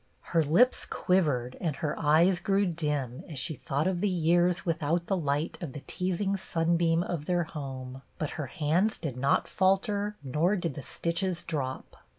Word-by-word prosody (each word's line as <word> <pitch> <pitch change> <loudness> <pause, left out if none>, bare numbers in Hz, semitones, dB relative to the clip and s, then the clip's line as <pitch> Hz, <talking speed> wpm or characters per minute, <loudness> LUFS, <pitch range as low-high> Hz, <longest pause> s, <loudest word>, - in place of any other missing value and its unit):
Her 165 - +5
lips 175 - +3
quivered 140 -10 +1
and 160 -5 -1
her 150 +1 -2
eyes 165 +4 +4
grew 200 +2 +2
dim 150 -7 -2
as 155 - -7
she 135 +4 -2
thought 140 +2 -2
of 185 -2 0
the 205 +2 +1
years 175 0 +2
without 165 0 0
the 195 - 0
light 150 -1 -1
of 155 -7 -5
the 145 - -7
teasing 190 +2 -1
sunbeam 170 -1 +1
of 165 -5 -4
their 175 -1 +2
home; 135 -4 -7 0.2
but 155 - -2
her 150 -5 -4
hands 170 - +1
did 145 -7 -4
not 135 +2 +2
falter 200 +2 +1
nor 155 +9 +1
did 170 -6 -2
the 145 - -6
stitches 170 +4 -2
drop. 135 -5 -4
165 Hz, 170 wpm, -29 LUFS, 145-180 Hz, 0.2 s, Her